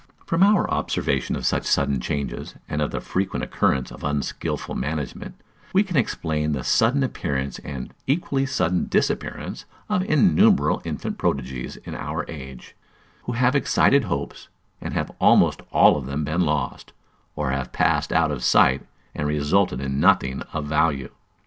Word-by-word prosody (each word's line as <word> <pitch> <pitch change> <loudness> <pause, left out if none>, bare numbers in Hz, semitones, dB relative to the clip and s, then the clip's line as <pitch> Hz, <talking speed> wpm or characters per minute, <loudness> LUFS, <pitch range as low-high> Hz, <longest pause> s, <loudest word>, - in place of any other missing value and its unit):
From 165 +1 0
our 205 0 +5
observation 70 -2 -1
of - - -4
such - - +1
sudden 70 -2 +1
changes, 70 -1 -4
and 75 - -2
of 75 - 0
the - - -3
frequent 95 +1 -2
occurrence 65 - 0
of - - -11
unskilful 75 -1 -3
management, 75 +1 -4 0.3
we 195 +2 +5
can 190 -4 -6
explain 75 - 0
the 65 -3 -3
sudden 130 +5 +3
appearance 70 - -3
and 70 -3 -7
equally 135 -2 0
sudden 90 -9 0
disappearance - - -2 0.2
of 185 - +2
innumerable 145 - +4
infant - - -4
prodigies 65 -2 -2
in - - -9
our - - -4
age, 65 -5 -10 0.5
who 125 - -3
have 125 +3 +2
excited 140 0 +3
hopes, 70 0 -4 0.3
and - - -5
have - - -2
almost - - +5
all - - +6
of 70 -3 -4
them 70 +3 -2
been 80 +5 0
lost, 75 -5 -2 0.4
or 65 - -1
have 70 -1 -3
passed - - +1
out 80 -2 +2
of 65 -4 -4
sight, 65 +1 +4 0.3
and 75 - -2
resulted 75 +1 +1
in 70 0 -2
nothing 65 -2 +3
of 75 - -3
value. 75 -3 0
75 Hz, 155 wpm, -23 LUFS, 70-110 Hz, 0.5 s, all